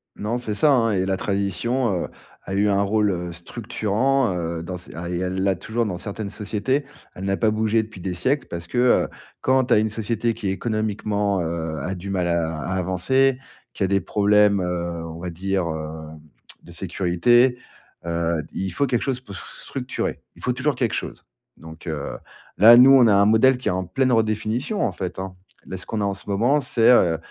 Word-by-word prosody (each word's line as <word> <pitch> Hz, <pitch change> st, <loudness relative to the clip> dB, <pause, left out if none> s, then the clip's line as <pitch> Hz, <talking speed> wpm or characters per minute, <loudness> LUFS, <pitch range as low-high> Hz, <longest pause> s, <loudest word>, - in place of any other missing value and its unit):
Non, 110 Hz, +4 st, -2 dB
c'est 110 Hz, -4 st, -3 dB
ça, 150 Hz, +7 st, +4 dB
hein, 115 Hz, -4 st, +2 dB
et 95 Hz, -1 st, +1 dB
la 95 Hz, 0 st, 0 dB
tradition, 100 Hz, +2 st, -1 dB
heu, -, -, -7 dB, 0.4 s
a 95 Hz, -, -6 dB
eu 105 Hz, +1 st, +3 dB
un 100 Hz, 0 st, +2 dB
rôle, 105 Hz, 0 st, +2 dB
heu, 90 Hz, -1 st, -4 dB
structurant, 110 Hz, +5 st, -1 dB
heu, 85 Hz, -1 st, -3 dB
dans 90 Hz, +1 st, -5 dB
ces 85 Hz, -8 st, -11 dB
ah 85 Hz, +1 st, -5 dB
et 90 Hz, -, -2 dB
elle 95 Hz, +1 st, -2 dB
l'a 95 Hz, -1 st, +2 dB
toujours 115 Hz, +5 st, -2 dB
dans 90 Hz, -4 st, -4 dB
certaines 100 Hz, -1 st, -5 dB
sociétés. 130 Hz, +7 st, -1 dB, 0.3 s
Elle 95 Hz, -, -7 dB
n'a 100 Hz, 0 st, 0 dB
pas 110 Hz, -2 st, +2 dB
bougé 110 Hz, +1 st, +1 dB
depuis 110 Hz, -4 st, -12 dB
des 90 Hz, 0 st, -3 dB
siècles 130 Hz, +11 st, 0 dB
parce 85 Hz, -1 st, -6 dB
que, 120 Hz, -, -5 dB
heu, 125 Hz, 0 st, +4 dB, 0.3 s
quand 130 Hz, 0 st, +3 dB
tu 120 Hz, -, +2 dB
as -, -, +5 dB
une 110 Hz, +1 st, +2 dB
société 115 Hz, +1 st, -1 dB
qui 105 Hz, -3 st, -5 dB
économiquement, 105 Hz, -2 st, -1 dB
heu, 80 Hz, -1 st, -3 dB
a 90 Hz, +7 st, -3 dB
du 95 Hz, +2 st, -7 dB
mal 90 Hz, -2 st, 0 dB
à 85 Hz, -2 st, 0 dB
à 95 Hz, -, -3 dB
avancer, 110 Hz, +9 st, +2 dB, 0.4 s
qui 100 Hz, -, -2 dB
a -, -, +2 dB
des 100 Hz, +1 st, +2 dB
problèmes, 105 Hz, -1 st, +3 dB
heu, 85 Hz, -1 st, -3 dB
on 80 Hz, 0 st, -8 dB
va 90 Hz, +1 st, -4 dB
dire, 95 Hz, +1 st, -2 dB
heu, 80 Hz, 0 st, -5 dB, 0.6 s
de 85 Hz, -, -13 dB
sécurité, 95 Hz, +8 st, +2 dB, 0.5 s
heu, 85 Hz, -1 st, -1 dB
il 95 Hz, -1 st, -3 dB
faut 140 Hz, +10 st, 0 dB
quelque 120 Hz, -2 st, 0 dB
chose 130 Hz, -2 st, -2 dB
pour 100 Hz, -6 st, -10 dB
s -, -, -7 dB
structurer. 130 Hz, -2 st, -4 dB, 0.2 s
Il -, -, -16 dB
faut 125 Hz, -, 0 dB
toujours 135 Hz, +3 st, 0 dB
quelque 120 Hz, -3 st, -1 dB
chose. -, -, -6 dB, 0.3 s
Donc, 80 Hz, +2 st, -12 dB
heu, 75 Hz, -3 st, -4 dB, 0.4 s
là, 115 Hz, +4 st, +9 dB
nous, 130 Hz, +2 st, +8 dB
on 135 Hz, -3 st, +7 dB
a 105 Hz, -, +5 dB
un 100 Hz, 0 st, +5 dB
modèle 110 Hz, +5 st, +5 dB
qui 125 Hz, -, -6 dB
est -, -, +3 dB
en 90 Hz, 0 st, -2 dB
pleine 130 Hz, +9 st, +1 dB
redéfinition, 110 Hz, -, 0 dB
en -, -, +1 dB
fait, 90 Hz, -1 st, -5 dB
hein. 95 Hz, -1 st, -6 dB, 0.3 s
Là, -, -, -4 dB
ce 90 Hz, -, -9 dB
qu'on 110 Hz, -, -3 dB
a -, -, +1 dB
en 100 Hz, -, 0 dB
ce 100 Hz, +1 st, -10 dB
moment, 120 Hz, +9 st, +2 dB
c'est, 115 Hz, -3 st, +3 dB
heu, 85 Hz, -9 st, +4 dB
100 Hz, 215 wpm, -23 LUFS, 90-115 Hz, 0.6 s, là